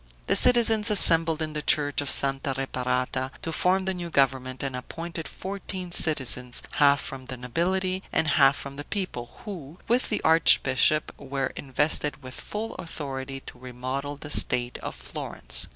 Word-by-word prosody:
The - - +2
citizens 225 -3 +6
assembled 165 -5 +7
in 155 -1 -5
the 150 - -4
church 145 -1 +1
of 145 - -4
Santa 135 0 -1
Reparata, 130 0 -2
to 165 - -4
form 185 +3 +1
the 190 - -1
new 175 -2 -6
government, 130 -3 0
and 135 -2 -3
appointed 165 +6 -7
fourteen 190 -2 -7
citizens, 125 -7 0
half 140 -1 +4
from 130 -1 -6
the 130 - -6
nobility 185 +9 -1
and 155 - +1
half 140 -2 +4
from 140 0 -9
the 145 - -6
people, 180 - -6
who, 170 -7 -8
with 245 +3 +1
the - - -1
archbishop, 155 -2 +3
were 135 -1 -4
invested 145 +1 -1
with 130 0 -9
full 215 +8 -6
authority 135 -5 -6
to 125 - -13
remodel 130 +3 -5
the 145 +1 -9
state 125 -3 0
of - - -7
Florence. - - +1
145 Hz, 160 wpm, -25 LUFS, 130-170 Hz, -, assembled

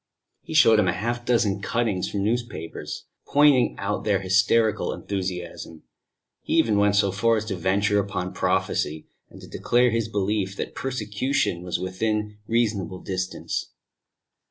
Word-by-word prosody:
He 160 - -7
showed 115 -8 +6
him 100 - +3
half 115 +7 -1
a - - -23
dozen 105 -5 +2
cuttings 110 -3 -1
from 100 -1 -2
newspapers, 110 -7 -4 0.2
pointing 145 -3 +4
out 100 +1 -2
their 100 -3 +2
hysterical 105 +4 +2
enthusiasm; 90 -4 -5 0.6
he - - -4
even 105 -3 +3
went 100 0 +3
so 100 -1 +3
far 115 +4 +2
as 110 - -3
to 105 -3 -3
venture 100 +4 +1
upon 95 -2 -3
prophecy, 90 -4 -1 0.2
and - - -14
to - - -11
declare 125 0 +2
his 115 -1 0
belief 100 -2 -1
that - - -5
persecution 120 -5 -1
was 90 -1 -3
within 105 +3 -2
reasonable 105 -6 0
distance. 95 -1 -4
100 Hz, 145 wpm, -24 LUFS, 95-115 Hz, 0.6 s, showed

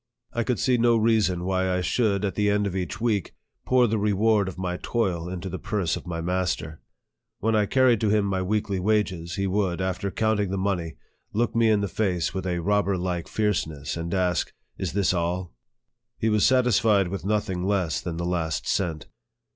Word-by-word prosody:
I 120 - 0
could 125 0 0
see 125 +2 +2
no 120 0 +4
reason 110 -6 +2
why 95 0 0
I 90 0 0
should, 100 +1 +1
at 95 - -1
the 105 -1 +1
end 105 0 +2
of 95 -2 -3
each 90 -4 -3
week, 110 -6 -1 0.3
pour 125 -1 +5
the 110 -1 0
reward 105 0 +2
of 95 - -6
my 90 -1 -2
toil 90 -8 -1
into 95 +1 -5
the 95 0 -5
purse 100 -6 -1
of - - -8
my 85 -1 -3
master. 90 -3 -2 0.6
When 110 +1 0
I 105 -1 +2
carried 130 -3 +3
to 110 - +2
him 105 -1 +2
my 95 -1 -1
weekly 100 0 -1
wages, 90 -4 0
he 100 - -1
would, 95 -2 0
after 95 +1 -2
counting 105 -1 0
the 95 - -2
money, 95 -4 -1 0.4
look 120 +3 0
me 115 -1 +4
in 105 -2 +3
the 100 - 0
face 90 -2 -1
with 95 0 -3
a 90 -1 -1
robber 100 -1 +1
like 90 -1 -3
fierceness, 80 -9 -1
and 85 0 -4
ask, 90 -2 0
" - - -45
Is - - -3
this 100 -1 +2
all? 90 +1 -2 0.3
" 120 0 -57
He 110 - 0
was 105 -1 +4
satisfied 115 -6 +3
with 95 -3 -5
nothing 100 -3 -1
less 95 -7 0
than 85 -2 -4
the 85 - -2
last 85 -3 -2
cent. 80 -5 -1
95 Hz, 205 wpm, -25 LUFS, 90-105 Hz, 0.6 s, pour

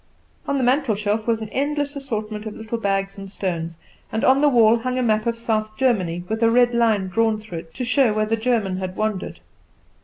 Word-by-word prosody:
On 280 - 0
the 265 - 0
mantelshelf 220 -5 +1
was 225 -1 +1
an 215 - -7
endless 290 +2 -1
assortment 220 -6 -4
of 210 - -7
little 225 +1 -5
bags 195 -1 -1
and 195 0 -8
stones; 170 -4 -4 0.3
and 220 - -2
on 270 +2 +5
the 295 - +5
wall 230 -3 +5
hung 255 +2 -2
a 255 - +1
map 215 -1 +1
of 230 0 0
South 215 -2 -1
Germany, 185 -9 +1
with 220 +3 -3
a 230 - +5
red 240 +1 +4
line 220 -5 +2
drawn 220 +3 +1
through 210 -6 -7
it 165 0 -14
to 255 - -3
show 255 -1 +3
where 215 0 +1
the 220 +1 +1
German 220 -5 0
had 185 -1 -4
wandered. 215 -3 -3
220 Hz, 215 wpm, -22 LUFS, 205-245 Hz, 0.3 s, on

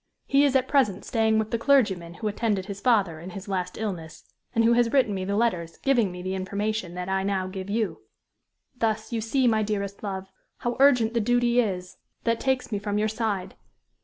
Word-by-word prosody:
He 275 +1 +4
is 280 -2 +3
at 260 -1 +3
present 220 -9 +2
staying 220 -1 +2
with 220 0 -1
the 230 - 0
clergyman 200 -11 +2
who 215 - -4
attended 210 -2 -1
his 200 0 -7
father 200 -10 +2
in 175 +3 -8
his 195 +2 -8
last 180 -2 -3
illness, 180 -8 -5 0.3
and 230 - +4
who 230 +1 +5
has 235 -1 +3
written 250 -7 +3
me 190 -1 -3
the 200 +1 -1
letters 180 -7 0
giving 240 -8 +2
me 180 0 -8
the 185 +1 -2
information 200 0 -2
that 180 0 -4
I 190 0 0
now 195 -1 -1
give 190 +1 -6
you. 220 0 -1 0.7
Thus, 220 -1 -1
you 225 - 0
see, 250 +4 +1
my 220 -2 +3
dearest 200 -2 -3
love, 190 -2 -5 0.3
how 240 0 -2
urgent 250 -5 +5
the 235 - +2
duty 245 +2 +2
is 185 -6 -2 0.3
that 230 -1 +1
takes 265 -2 0
me 205 - -1
from 205 0 -2
your 215 +1 +2
side. 215 -4 -2
215 Hz, 210 wpm, -26 LUFS, 190-235 Hz, 0.7 s, who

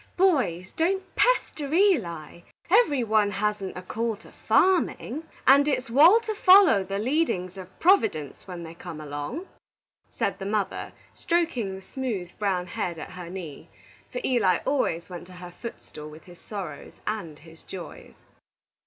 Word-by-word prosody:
"Boys, 255 - +2
don't 380 +4 0
pester 310 - +1
Eli. 210 - +1 0.3
Every 315 - +4
one 215 -2 +3
hasn't 205 -1 -2
a 180 - -7
call 225 +4 -2
to 215 - -17
farmin', 330 -5 +1 0.2
and 280 +2 +6
it's 255 -4 -1
wal 325 - +7
to 440 -1 -3
foller 370 - +6
the 195 +1 -4
leadin's 210 - 0
of 185 -1 -11
Providence 220 - +2
when 175 -2 -7
they 165 0 -8
come 170 -2 -9
along," 150 - -5 0.6
said - - -2
the 195 - -5
mother, 205 -1 -2 0.2
stroking 290 - -1
the 190 - -10
smooth, 210 -7 -4
brown 190 -4 0
head 180 -4 -4
at - - -8
her 180 -2 -8
knee; 170 -6 -8 0.4
for - - -3
Eli 220 -8 +3
always 175 - 0
went 175 -1 -9
to 185 - -13
her 180 0 -10
footstool 175 -6 -9
with 155 +1 -13
his 175 -1 -15
sorrows 185 -9 -7
and 170 -9 -4
his 165 +1 -16
joys. 180 -3 -10
205 Hz, 155 wpm, -26 LUFS, 175-285 Hz, 0.6 s, wal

